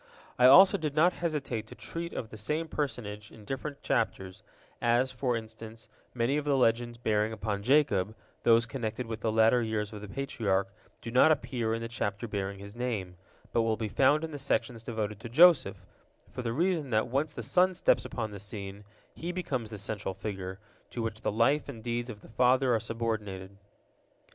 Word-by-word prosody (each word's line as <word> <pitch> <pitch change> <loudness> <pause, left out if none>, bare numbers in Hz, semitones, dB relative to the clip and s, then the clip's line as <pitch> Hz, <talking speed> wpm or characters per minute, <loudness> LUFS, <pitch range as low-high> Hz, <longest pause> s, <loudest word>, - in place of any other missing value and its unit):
I 125 - +8
also 190 +8 +8
did 150 -3 -3
not 175 +4 +4
hesitate 140 -9 -2
to - - -11
treat 170 +1 -6
of 110 - -6
the - - -8
same 150 +10 -2
personage 110 -9 -4
in 110 -2 -14
different 140 +4 -5
chapters, 95 -1 -1 0.4
as, 120 +2 +2
for 125 -1 -1
instance, 110 0 -9 0.3
many 125 +4 +1
of 150 - -2
the 140 -2 +2
legends 120 -1 +1
bearing 110 -2 +1
upon 105 -2 -3
Jacob, 110 -6 +2 0.3
those 115 0 +5
connected 115 0 -4
with 115 -1 -5
the 110 - 0
latter 110 +2 +4
years 110 -2 -2
of 105 - -7
the 105 - -7
Patriarch, 100 -5 -1 0.3
do 115 - -5
not 130 +6 +6
appear 120 -7 0
in 115 - -4
the - - -3
chapter 115 -1 -3
bearing 100 -2 -3
his 100 +2 -10
name, 110 -7 -3 0.4
but 115 - +3
will 110 -1 +1
be 110 - -2
found 140 +8 +3
in 160 - -4
the 145 - -6
sections 115 -4 -1
devoted 110 -3 -4
to 115 - -8
Joseph, 170 +5 +5 0.5
for - - -5
the 115 -2 -2
reason 165 +1 0
that 110 -2 +2
once 140 +4 0
the 120 -6 -7
son 180 - +3
steps - - +3
upon 110 -2 -4
the 100 - -8
scene, 100 0 -7 0.3
he 170 +2 -4
becomes 135 -11 -3
the 110 - -7
central 100 -1 -4
figure, 95 -2 -5 0.3
to 120 - -4
which 110 -1 -4
the - - 0
life 135 +8 +2
and 115 -5 -8
deeds 120 +1 -2
of 105 -3 -8
the - - -15
father 125 +2 +3
are 115 - +2
subordinated. 105 -4 -4
115 Hz, 195 wpm, -30 LUFS, 105-135 Hz, 0.5 s, I